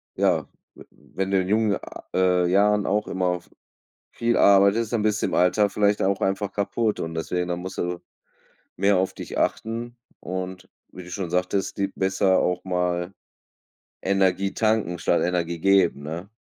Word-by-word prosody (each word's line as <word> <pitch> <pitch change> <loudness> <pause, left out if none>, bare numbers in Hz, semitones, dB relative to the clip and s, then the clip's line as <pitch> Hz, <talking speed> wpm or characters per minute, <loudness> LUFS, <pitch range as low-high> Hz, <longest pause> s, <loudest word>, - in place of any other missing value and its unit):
ja, - - +1 0.3
w - - -13
wenn 95 0 -5
du 95 -1 +3
in 90 - -4
jungen, 105 -1 +2
ah, - - -10
äh, 90 -1 +3
Jahren 105 +2 +3
auch 105 +2 0
immer 90 -2 -1
v - - -25 0.6
viel 120 0 0
arbeitest, 100 +3 +4
dann 110 - +1
bist 105 0 +1
du - - +2
im - - -3
Alter 100 +3 +3
vielleicht 105 0 +1
auch 95 0 +1
einfach 95 +1 0
kaputt 105 +2 -1
und 80 0 -4
deswegen 90 +2 -2
dann 90 0 -2
musst 95 +2 -7
du 90 0 -2 0.8
mehr 100 +1 +3
auf 95 +1 0
dich - - -7
achten. 115 +2 -2 0.2
Und 95 0 -6 0.2
wie 90 - -10
du 90 - -12
schon 90 -1 -4
sagtest, 90 +2 -1
die 100 -1 +1
besser 95 -1 +1
auch 90 0 0
mal 90 0 -1 0.9
Energie 95 0 +1
tanken 110 -6 0
statt 85 - +1
Energie 85 -1 -1
geben, 95 -5 +3
ne? 85 +6 -6
95 Hz, 170 wpm, -24 LUFS, 90-100 Hz, 0.9 s, arbeitest